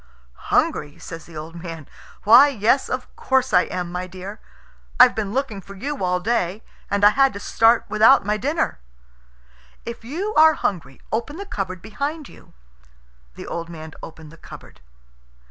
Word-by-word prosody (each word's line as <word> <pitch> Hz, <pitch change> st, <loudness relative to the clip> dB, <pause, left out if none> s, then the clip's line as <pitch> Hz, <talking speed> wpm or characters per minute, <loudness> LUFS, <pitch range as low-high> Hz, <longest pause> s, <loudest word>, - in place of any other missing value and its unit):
"Hungry!" 145 Hz, -1 st, 0 dB
says 165 Hz, -2 st, -10 dB
the 165 Hz, -2 st, -11 dB
old 160 Hz, +2 st, -8 dB
man. 165 Hz, -4 st, -8 dB, 0.4 s
"Why, 240 Hz, +7 st, +8 dB
yes, 260 Hz, 0 st, +1 dB
of 255 Hz, 0 st, -5 dB
course 265 Hz, -1 st, 0 dB
I 180 Hz, -, +5 dB
am, 180 Hz, -1 st, -5 dB
my 180 Hz, +1 st, -4 dB
dear. 190 Hz, +3 st, -9 dB, 0.6 s
I've 250 Hz, 0 st, +8 dB
been 210 Hz, -3 st, -3 dB
looking 235 Hz, -5 st, -3 dB
for 195 Hz, +2 st, -12 dB
you 275 Hz, +4 st, -4 dB
all 180 Hz, 0 st, +1 dB
day, 205 Hz, -1 st, -1 dB, 0.3 s
and 200 Hz, 0 st, -1 dB
I 205 Hz, -, +8 dB
had 270 Hz, +4 st, +3 dB
to 200 Hz, -, -7 dB
start 225 Hz, +3 st, +3 dB
without 220 Hz, +1 st, +5 dB
my 210 Hz, +1 st, +1 dB
dinner." 285 Hz, -, -1 dB, 1.1 s
"If 235 Hz, -1 st, -7 dB
you 355 Hz, -, -4 dB
are 315 Hz, +1 st, +6 dB
hungry, 140 Hz, -9 st, -4 dB
open 235 Hz, +8 st, -3 dB
the 400 Hz, -, -6 dB
cupboard 185 Hz, -, -5 dB
behind 280 Hz, +8 st, -4 dB
you." -, -, -18 dB, 0.8 s
The -, -, -9 dB
old 170 Hz, 0 st, -5 dB
man 160 Hz, -1 st, -9 dB
opened 160 Hz, -1 st, -11 dB
the 165 Hz, -, -15 dB
cupboard. -, -, -14 dB
210 Hz, 165 wpm, -22 LUFS, 180-260 Hz, 1.1 s, Why